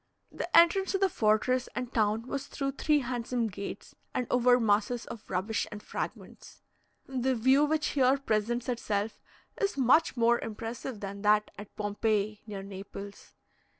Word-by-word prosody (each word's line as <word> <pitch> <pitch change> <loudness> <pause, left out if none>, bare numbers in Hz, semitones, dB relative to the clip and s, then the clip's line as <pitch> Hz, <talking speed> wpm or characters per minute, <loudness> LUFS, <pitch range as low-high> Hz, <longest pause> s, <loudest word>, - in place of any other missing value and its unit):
The - - -5
entrance 370 +3 +5
to - - +3
the 390 0 +2
fortress 240 0 +1
and 250 -1 -4
town 220 0 +1
was 275 +1 -4
through 275 -1 -3
three 295 +1 +2
handsome 245 -1 -2
gates, 200 0 -7 0.2
and 250 - 0
over 250 0 +5
masses 220 +2 +1
of 220 - -10
rubbish 190 +4 -1
and 210 0 -8
fragments. - - -7 0.4
The 260 0 0
view 260 +5 +4
which 310 +1 0
here 265 -1 +3
presents 240 -1 -1
itself 220 -3 -2 0.4
is 400 -7 0
much 265 +2 +4
more 235 0 +4
impressive 225 +1 -6
than 200 0 -6
that 210 0 +3
at 205 0 -11
Pompeii, 210 0 -1
near 200 -2 -6
Naples. 200 +1 -9
235 Hz, 150 wpm, -29 LUFS, 210-260 Hz, 0.4 s, entrance